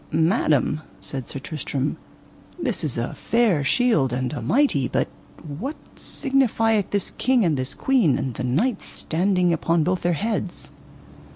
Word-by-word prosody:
Madam, 155 Hz, -, +2 dB, 0.2 s
said 120 Hz, +6 st, -3 dB
Sir -, -, -5 dB
Tristram, 140 Hz, -1 st, -3 dB, 0.6 s
this 250 Hz, -, -1 dB
is 150 Hz, -6 st, -2 dB
a 115 Hz, -, -2 dB
fair 225 Hz, -11 st, +2 dB
shield 150 Hz, -, +2 dB
and 125 Hz, 0 st, -2 dB
a -, -, -4 dB
mighty; 145 Hz, -, +2 dB
but -, -, 0 dB, 0.5 s
what 275 Hz, -, -3 dB, 0.2 s
signifieth 225 Hz, -6 st, +1 dB
this 200 Hz, -2 st, 0 dB
king 255 Hz, -4 st, +3 dB
and 160 Hz, -3 st, +2 dB
this 130 Hz, 0 st, -3 dB
queen, 240 Hz, -, +3 dB
and 130 Hz, -, -3 dB
the 125 Hz, -, -5 dB
knight 185 Hz, -, +1 dB
standing 180 Hz, +1 st, 0 dB
upon 165 Hz, 0 st, +1 dB
both 180 Hz, +2 st, 0 dB
their 175 Hz, 0 st, +1 dB
heads? 205 Hz, 0 st, -3 dB
170 Hz, 150 wpm, -23 LUFS, 140-225 Hz, 0.6 s, king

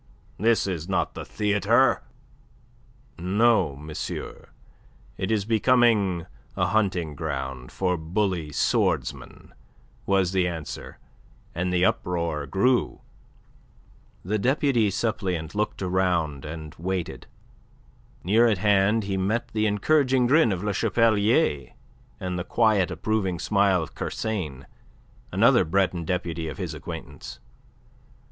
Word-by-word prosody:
This 115 Hz, +2 st, +3 dB
is 90 Hz, -3 st, -4 dB
not 95 Hz, -, 0 dB
the -, -, -6 dB
theatre!" 100 Hz, -2 st, +2 dB, 1.2 s
"No, 100 Hz, -3 st, +2 dB
monsieur, 75 Hz, +2 st, -7 dB, 0.7 s
it 95 Hz, +1 st, -3 dB
is 105 Hz, -3 st, +1 dB
becoming 110 Hz, -6 st, +3 dB, 0.3 s
a -, -, +2 dB
hunting 95 Hz, -7 st, 0 dB
ground 65 Hz, -4 st, -5 dB
for 90 Hz, -2 st, 0 dB
bully 85 Hz, -1 st, -2 dB
swordsmen," -, -, -1 dB, 0.5 s
was 95 Hz, -2 st, +2 dB
the 95 Hz, -2 st, +1 dB
answer, 80 Hz, -4 st, -6 dB, 0.6 s
and 90 Hz, +2 st, -2 dB
the 90 Hz, 0 st, +3 dB
uproar 85 Hz, -6 st, -1 dB
grew. 125 Hz, +6 st, +1 dB, 1.2 s
The 105 Hz, +3 st, 0 dB
deputy 130 Hz, -2 st, +2 dB
suppleant 95 Hz, -6 st, -2 dB
looked 105 Hz, -1 st, -2 dB
round 90 Hz, -6 st, 0 dB
and 75 Hz, 0 st, -7 dB
waited. 90 Hz, 0 st, -4 dB, 1.0 s
Near 110 Hz, +6 st, +4 dB
at 110 Hz, -4 st, +2 dB
hand 105 Hz, +2 st, +3 dB
he 100 Hz, -1 st, -2 dB
met 105 Hz, +5 st, -1 dB
the 110 Hz, 0 st, 0 dB
encouraging 130 Hz, +4 st, +2 dB
grin 140 Hz, -1 st, +4 dB
of 95 Hz, 0 st, -3 dB
Le 105 Hz, -1 st, -1 dB
Chapelier, 110 Hz, -, +2 dB, 0.5 s
and 90 Hz, -1 st, -3 dB
the -, -, -2 dB
quiet, 105 Hz, -2 st, +2 dB
approving 95 Hz, +1 st, -1 dB
smile 100 Hz, -1 st, +2 dB
of -, -, -10 dB
Kersain, 80 Hz, -12 st, -4 dB, 0.7 s
another -, -, +4 dB
Breton 90 Hz, 0 st, 0 dB
deputy 85 Hz, -2 st, -2 dB
of 75 Hz, -, -6 dB
his -, -, -4 dB
acquaintance. 70 Hz, -3 st, -8 dB
95 Hz, 115 wpm, -25 LUFS, 85-110 Hz, 1.2 s, Near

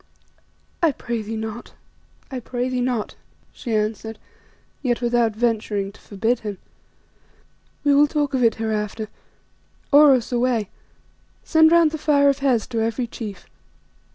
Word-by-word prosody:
"I 325 Hz, -4 st, +3 dB
pray 235 Hz, -2 st, -4 dB
thee 220 Hz, +1 st, -5 dB
not, 220 Hz, +2 st, -6 dB, 0.6 s
I 260 Hz, -, -3 dB
pray 245 Hz, +1 st, -3 dB
thee 255 Hz, -1 st, -1 dB
not," 245 Hz, -4 st, -1 dB, 0.4 s
she 230 Hz, -4 st, -3 dB
answered, 215 Hz, +1 st, -2 dB, 0.6 s
yet 245 Hz, -4 st, 0 dB
without 235 Hz, -2 st, +1 dB
venturing 215 Hz, -4 st, -1 dB
to -, -, -20 dB
forbid 225 Hz, +4 st, -1 dB
him. 205 Hz, -3 st, -5 dB, 1.3 s
"We 290 Hz, -1 st, +4 dB
will 290 Hz, +1 st, +6 dB
talk 290 Hz, -2 st, -1 dB
of 255 Hz, -2 st, +1 dB
it 225 Hz, -2 st, +4 dB
hereafter. 215 Hz, -1 st, -3 dB, 0.8 s
Oros, 280 Hz, -5 st, +6 dB
away! 240 Hz, -4 st, 0 dB, 0.7 s
Send 320 Hz, -1 st, +5 dB
round 335 Hz, -2 st, +5 dB
the 315 Hz, -, -5 dB
Fire 285 Hz, -2 st, +4 dB
of 275 Hz, -, 0 dB
Hes 255 Hz, -6 st, +2 dB
to 230 Hz, -2 st, -1 dB
every 230 Hz, +2 st, -1 dB
chief. 215 Hz, -4 st, -8 dB
240 Hz, 140 wpm, -22 LUFS, 220-275 Hz, 1.3 s, will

